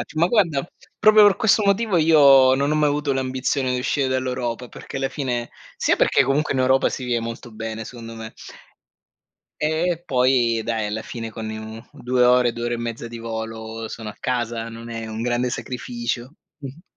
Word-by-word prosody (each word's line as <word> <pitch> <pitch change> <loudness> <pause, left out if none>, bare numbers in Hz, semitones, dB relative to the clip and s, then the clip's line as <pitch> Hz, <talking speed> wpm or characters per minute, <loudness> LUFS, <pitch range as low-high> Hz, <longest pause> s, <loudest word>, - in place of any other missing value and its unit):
Ma 170 +3 +3
guarda 170 - +2 0.3
proprio 215 0 +7
per 200 - +3
questo 220 -1 +3
motivo 200 -1 +2
io 140 -5 +6
non 140 +2 0
ho - - +2
mai 150 -1 +3
avuto 145 -1 0
l'ambizione 130 0 -1
di 125 - -1
uscire 135 +2 0
dall'Europa, 125 -2 -2
perché - - -8
alla 135 0 -1
fine 125 -5 -3 0.3
sia - - +2
perché - - +3
comunque 140 +2 0
in 130 - -1
Europa 130 +1 +3
si 130 - -5
vive 120 -1 0
molto 115 +1 -7
bene 110 0 -5
secondo 115 -1 -9
me. 110 0 -8 1.2
E 150 +1 0 0.2
e 175 -1 -3
poi 125 -3 +2
dai 110 -2 -1
alla 105 +2 -3
fine 115 -1 -6
con 110 0 -6 0.4
2 125 -3 0
ore, 125 -1 +4
2 120 0 -4
ore 120 - -1
e 120 - -2
mezza 115 0 -5
di 115 0 -8
volo 115 0 -6
sono 110 -1 -7
a - - -10
casa, 120 -2 -2
non 115 +1 -9
è 115 -1 -5
un 110 +1 -5
grande 120 +1 0
sacrificio. 120 +1 -4 0.3
Mh-mh. 140 +3 -9
125 Hz, 185 wpm, -22 LUFS, 115-140 Hz, 1.2 s, proprio